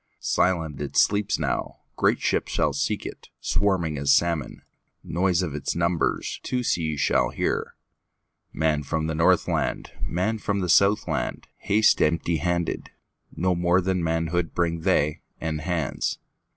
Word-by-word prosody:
Silent 80 -6 0
it 70 - -4
sleeps 105 0 +3
now; - - -2 0.2
Great - - +2
ships - - 0
shall 75 - +1
seek 70 - -1
it, - - -9
Swarming 85 -7 0
as 70 0 +2
salmon; 85 -1 +1 0.4
Noise 90 +1 +1
of 80 -5 -3
its 75 - -3
numbersTwo 85 +8 -1
seas 80 -7 0
shall - - +2
hear. - - -2 0.8
Man 80 -1 +1
from 80 +2 -2
the 80 - -2
Northland, 80 +1 +1
Man 110 +6 -1
from 100 -1 -1
the 90 - -2
Southland, 100 +4 +2
Haste 110 +2 +3
empty 80 +1 +1
handed; 85 +2 -2 0.5
No 90 +1 +1
more 85 +1 +2
than 95 -1 0
manhoodBring 85 0 -1
they, 75 0 +1 0.2
and 80 -1 -3
hands. 80 -3 -2
85 Hz, 135 wpm, -25 LUFS, 80-90 Hz, 0.8 s, sleeps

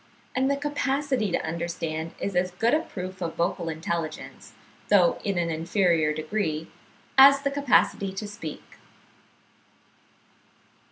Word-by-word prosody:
And 265 +1 +2
the 280 - +1
capacity 280 -5 -1
to - - -1
understand 165 -1 -4
is 195 - -3
as 180 +1 +2
good 225 +8 0
a 305 - +4
proof 185 -7 -7
of 165 -2 -3
vocal 170 0 -1
intelligence, 160 0 -5 0.4
though 185 -4 +4
in 200 -3 -1
an 170 -1 0
inferior 165 -1 +1
degree, 155 0 -3 0.5
as 275 +1 +8
the 280 - 0
capacity 275 -8 +2
to 205 +2 -5
speak." 205 +4 -9
185 Hz, 125 wpm, -26 LUFS, 165-250 Hz, 0.5 s, as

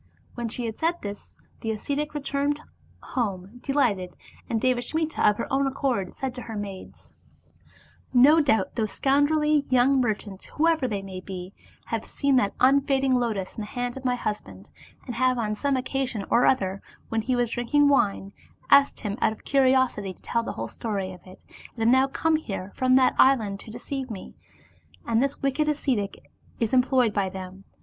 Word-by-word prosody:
When 240 -1 -4
she 240 +2 -3
had 220 -1 -5
said 330 +2 +1
this, 205 0 -8 0.2
the 225 - -4
ascetic 285 +7 -3
returned 285 0 -1 0.4
home 205 -2 -3
delighted, 235 -10 0 0.3
and 225 - 0
Devasmita 255 +6 -1
of 210 0 +4
her - - -2
own 275 0 +2
accord 260 -8 -1
said 265 -2 -3
to 250 - -7
her 225 -2 -7
maids: 200 -2 -8 0.5
" - - -27 0.2
No 275 +6 +6
doubt 280 -7 +1
those 220 -3 -1
scoundrelly 295 +2 +2
young 255 +1 +4
merchants, 210 -4 -3
whoever 320 -3 +1
they 200 -4 -3
may 190 -1 -7
be, 185 0 -7 0.3
have 225 -1 -3
seen 280 -1 0
that 205 -5 +1
unfading 270 0 +3
lotus 225 -7 -1
in - - -5
the 210 - -5
hand 245 +2 -3
of 265 - -8
my 250 -1 +1
husband, 100 - -5 0.3
and 245 - -5
have 255 +1 +2
on 215 -3 -1
some 270 +5 0
occasion 255 -5 -2
or 240 - +5
other, 195 -6 +1 0.3
when 225 0 0
he 250 +3 0
was 240 -2 0
drinking 285 +5 +2
wine, 200 -7 +1 0.4
asked 280 0 +5
him 210 -1 -4
out - - +3
of - - -17
curiosity 260 -7 +2
to - - -21
tell 235 - 0
the 230 - -5
whole - - -4
story 195 -4 -4
of 180 - -13
it, 185 - -13 0.4
and 225 - -2
have - - +3
now 260 +2 +5
come 315 +3 +1
here 200 -9 -6
from 255 0 +3
that 260 -1 +5
island 220 -7 +4
to - - -11
deceive 260 +3 -5
me, 205 -4 -8 0.7
and 230 0 +2
this 275 +1 -2
wicked 285 +3 +1
ascetic 255 -9 -2 0.3
is 230 0 -1
employed 250 -3 +3
by 195 -2 0
them. 190 +1 -9
245 Hz, 185 wpm, -25 LUFS, 205-270 Hz, 0.7 s, No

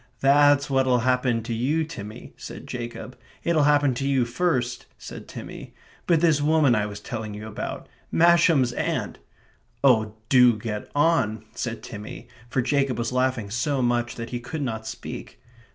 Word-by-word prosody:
"That's 145 +1 +5
what'll 130 -3 +2
happen 125 -2 +1
to 115 - -4
you, 140 +8 0
Timmy," 110 -10 -9
said - - -9
Jacob. 120 -1 -6 0.3
"It'll 160 -4 +3
happen 145 -2 +4
to 135 +3 -2
you 135 -3 +2
first," 125 -2 -1
said - - -10
Timmy. - - -9 0.3
"But 165 -3 +3
this 160 -4 +3
woman 150 -3 +4
I 105 -2 +1
was 100 -1 -7
telling 110 -3 -6
you 105 +1 -7
about 110 - -6 0.2
Masham's 165 -7 +4
aunt - - -2 0.3
" - - -39
"Oh, 110 -5 +3
do 125 -3 +6
get 105 -1 -5
on," 130 -9 +2
said 120 -1 -4
Timmy, 105 +2 -8 0.2
for 125 - 0
Jacob 135 -2 +1
was 120 0 -2
laughing 125 -5 0
so 130 +3 0
much 120 0 0
that 115 -1 -7
he 120 - -3
could 145 +5 -5
not 110 -3 -4
speak. - - -8
125 Hz, 165 wpm, -25 LUFS, 115-145 Hz, 0.3 s, do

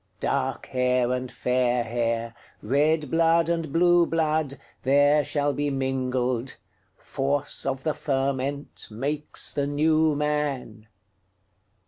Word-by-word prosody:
Dark - - -1
hair 125 -1 +1
and 125 0 -3
fair 125 -1 +1
hair, 115 0 -2 0.3
Red 150 +4 +1
blood 165 0 +3
and 165 -3 -1
blue 175 +1 +4
blood, 155 -3 0 0.2
There 145 +3 +4
shall 145 +1 0
be 145 0 -1
mingled; 130 -2 -1 0.4
Force 140 +1 -2
of 135 -1 -2
the 155 - 0
fermentMakes 140 0 -3
the 140 -1 -1
New 155 +1 +2
Man. 145 -7 -2
140 Hz, 105 wpm, -25 LUFS, 125-150 Hz, 0.4 s, blue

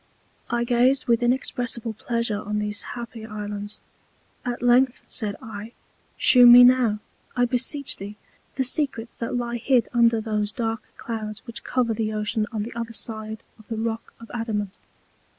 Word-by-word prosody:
I 240 0 +1
gazed 245 +3 +3
with 235 -1 +3
inexpressible 245 -2 -1
Pleasure 230 -1 -2
on 210 0 -3
these 210 0 -1 0.2
happy 235 -1 -7
Islands. 210 -1 -5 0.6
At 245 -1 -4
length, 245 +1 +4
said 210 -3 -2
I, 220 +1 -8 0.4
shew 245 -1 +7
me 245 +1 +11
now, 245 -4 +5 0.4
I 245 -1 +3
beseech 260 +3 0
thee, 205 +2 -8 0.4
the 265 - +1
Secrets 255 -4 +1
that 230 +1 -4
lie 240 0 -2
hid 245 0 +2
under 235 -1 +4
those 215 -1 -1
dark 225 -2 -2 0.2
Clouds 215 -2 -5
which 235 -2 -7
cover 245 -3 0
the 215 0 -2
Ocean 215 +1 -1
on 215 -3 -2
the 235 - -7
other 230 0 -5
side 220 -1 -5 0.2
of 220 - -17
the 225 - -4
Rock 225 0 -4
of 230 - -12
Adamant. 215 -4 -3
230 Hz, 160 wpm, -24 LUFS, 215-245 Hz, 0.6 s, me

